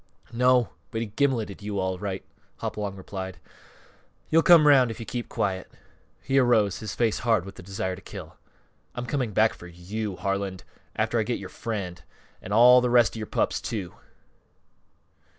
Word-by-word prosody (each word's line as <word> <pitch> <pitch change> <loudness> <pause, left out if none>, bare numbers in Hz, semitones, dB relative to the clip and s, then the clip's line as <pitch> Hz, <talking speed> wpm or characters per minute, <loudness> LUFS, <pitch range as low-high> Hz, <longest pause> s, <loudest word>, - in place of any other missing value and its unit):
"No; 125 0 +3 0.2
but 110 - -3
he 115 - -2
gimleted 115 -4 -1
you, 105 0 -4
all 95 -1 -1
right," 95 -1 -4 0.3
Hopalong 100 -2 -4
replied. 95 -1 -7 0.9
"You'll 165 - +6
come 165 -3 +7
'round 135 -4 +6
if 115 +1 -6
you 115 - -6
keep 120 +1 -5
quiet." 95 -2 -2 0.5
He 135 0 +2
arose, 110 -6 +3
his 110 - -5
face 115 -3 +1
hard 115 -7 +1
with 100 - -9
the - - -12
desire 95 0 -3
to 95 - -13
kill. - - -10 0.6
"I'm 125 - -4
coming 125 -4 -1
back 110 +2 +3
for 90 - -12
you, 95 +4 -5
Harlan, 100 -1 -2 0.3
after - - 0
I - - +3
get - - -1
yore - - -8
friend! 95 -7 -5 0.4
An' 95 - -8
all 125 +3 +7
th' - - 0
rest 120 -1 +4
of - - -5
you 110 - -5
pups, - - 0
too!" 100 -6 -4
105 Hz, 175 wpm, -26 LUFS, 95-120 Hz, 0.9 s, come